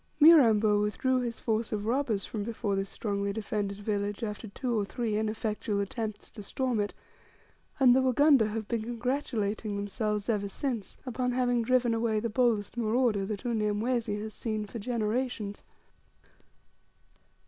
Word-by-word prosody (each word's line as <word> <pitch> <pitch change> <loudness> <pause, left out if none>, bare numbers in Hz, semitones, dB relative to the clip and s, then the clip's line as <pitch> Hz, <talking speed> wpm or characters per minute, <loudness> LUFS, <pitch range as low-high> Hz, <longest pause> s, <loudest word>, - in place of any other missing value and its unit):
Mirambo 225 -10 +7
withdrew 255 +5 +1
his 235 -2 -3
force 225 -1 -1
of 210 -1 -2
robbers 230 -4 0
from 215 - -4
before 210 -2 -2
this 195 0 -2
strongly 200 -2 -2
defended 205 -1 -3
village 205 +1 -2
after 210 +1 -4
two 240 +4 -2
or - - +1
three 220 +1 -2
ineffectual 215 -1 -1
attempts 210 +1 -4
to 215 - -9
storm 245 +3 -1
it, 205 0 0 0.9
and 250 -2 +7
the 265 - +4
Wagunda 260 -2 +5
have 215 0 -4
been 235 -2 -1
congratulating 230 -3 -2
themselves 205 +1 -2
ever 210 -3 0
since, 230 0 -4
upon 250 0 -1
having 245 -1 +2
driven 245 0 +2
away 225 -1 +1
the 230 +2 -2
boldest 230 -2 +1
marauder 225 -3 +1
that 210 0 -5
Unyamwezi 220 0 0
has 215 0 -6
seen 215 -2 -3
for 230 +3 -7
generations. 220 -1 -2
220 Hz, 150 wpm, -29 LUFS, 205-245 Hz, 0.9 s, Mirambo